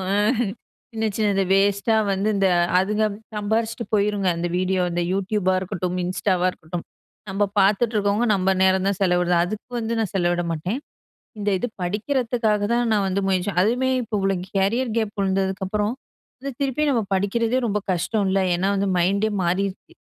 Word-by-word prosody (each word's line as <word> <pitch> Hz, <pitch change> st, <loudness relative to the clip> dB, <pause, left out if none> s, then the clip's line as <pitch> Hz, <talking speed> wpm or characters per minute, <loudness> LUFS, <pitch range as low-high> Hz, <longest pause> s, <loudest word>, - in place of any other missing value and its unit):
அ. -, -, +2 dB, 0.8 s
சின்ன 220 Hz, 0 st, -1 dB
சின்னது 205 Hz, -3 st, +2 dB
வேஸ்ட்டா 200 Hz, +3 st, +3 dB, 0.2 s
வந்து, 195 Hz, +3 st, 0 dB
இந்த 195 Hz, -1 st, +3 dB, 0.3 s
அதுங்க 210 Hz, +3 st, +1 dB, 0.3 s
சம்பாரிச்சுட்டு 220 Hz, +2 st, -1 dB
போயிருங்க. 205 Hz, -2 st, +1 dB
அந்த 175 Hz, +1 st, -2 dB
வீடியோ 185 Hz, 0 st, +1 dB
இந்த 175 Hz, 0 st, 0 dB
Youtubeபா 195 Hz, -1 st, 0 dB
இருக்கட்டும், 180 Hz, -1 st, -3 dB
Instaவா 185 Hz, 0 st, 0 dB
இருக்கட்டும், 170 Hz, 0 st, -7 dB, 0.5 s
நம்ப 200 Hz, +2 st, +1 dB, 0.2 s
பாத்துட்டு 215 Hz, +4 st, +2 dB
இருக்கவங்க, 205 Hz, +3 st, +1 dB
நம்ப 190 Hz, -1 st, +1 dB
நேரம் 190 Hz, 0 st, +3 dB
தான் 200 Hz, -, -1 dB
செலவிடுறது. 180 Hz, -1 st, +2 dB
அதுக்கு 215 Hz, +6 st, -6 dB
வந்து 230 Hz, 0 st, -2 dB
நான் 215 Hz, -5 st, -2 dB
செலவிட 175 Hz, -1 st, +1 dB
மாட்டேன். 180 Hz, -, -3 dB, 0.6 s
இந்த 205 Hz, 0 st, 0 dB
இது 245 Hz, -, -2 dB
படிக்கிறதுக்காக 220 Hz, +2 st, 0 dB
தான் 240 Hz, 0 st, +2 dB
நான் 205 Hz, -2 st, +2 dB
வந்து 190 Hz, +1 st, 0 dB
முயற்சி 185 Hz, +1 st, +1 dB
அதுவுமே 250 Hz, +5 st, +1 dB
இப்போ 225 Hz, -1 st, -7 dB
இவ்வளோ 195 Hz, 0 st, +1 dB, 0.2 s
கேரியர் 230 Hz, +6 st, +1 dB
கேப் 215 Hz, -1 st, -2 dB
விழுந்ததுக்கு 190 Hz, 0 st, 0 dB
அப்புறம் 210 Hz, +2 st, 0 dB, 0.5 s
வந்து, 275 Hz, +1 st, -5 dB
திருப்பியும் 280 Hz, +2 st, +1 dB
நம்ம 230 Hz, -4 st, +1 dB
படிக்கிறதே 225 Hz, +5 st, +1 dB
ரொம்ப 210 Hz, 0 st, 0 dB
கஷ்டம் 200 Hz, +4 st, 0 dB
இல்ல! 195 Hz, -, +2 dB
ஏன்னா 180 Hz, +3 st, 0 dB
வந்து 195 Hz, 0 st, 0 dB
மைண்டே 200 Hz, +5 st, +2 dB
மாறிருச்சு. 185 Hz, +2 st, -2 dB
200 Hz, 160 wpm, -23 LUFS, 190-220 Hz, 0.8 s, வேஸ்ட்டா